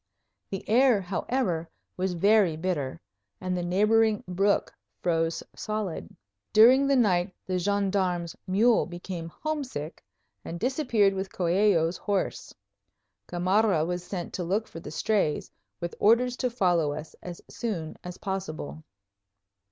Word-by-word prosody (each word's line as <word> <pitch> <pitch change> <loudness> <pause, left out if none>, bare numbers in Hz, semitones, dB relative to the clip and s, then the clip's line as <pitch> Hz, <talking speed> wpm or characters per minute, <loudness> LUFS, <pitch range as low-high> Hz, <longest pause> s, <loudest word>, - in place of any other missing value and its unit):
The 195 - -5
air, 245 0 +5
however, 185 -2 -1 0.3
was 185 0 -1
very 200 -2 +4
bitter 160 -6 -2 0.4
and 185 0 -2
the 180 - -1
neighboring 210 +4 +3
brook 195 +3 +1 0.3
froze 165 - 0
solid. 210 - -4 0.4
During 255 +6 +7
the 275 - +4
night 185 -6 +2
the 185 -1 -1
gendarme's 190 -3 0
mule 220 +5 +3
became 175 -1 -6
homesick 260 - -5 0.4
and 170 - -6
disappeared 240 - +2
with 190 0 -4
Coello's 180 -1 +2
horse. 200 -2 -2 0.8
Gamarra 180 -1 +2
was 175 +1 -3
sent 180 -1 -5
to 180 - -3
look 200 +6 -1
for 165 - -9
the 165 - -8
strays, 155 0 0 0.3
with 170 0 -4
orders 240 +4 +4
to 250 - 0
follow 175 - +2
us 155 +1 -8
as 175 -1 -7
soon 175 -9 -4
as 180 0 -7
possible. 170 -5 -5
185 Hz, 130 wpm, -27 LUFS, 170-215 Hz, 0.8 s, During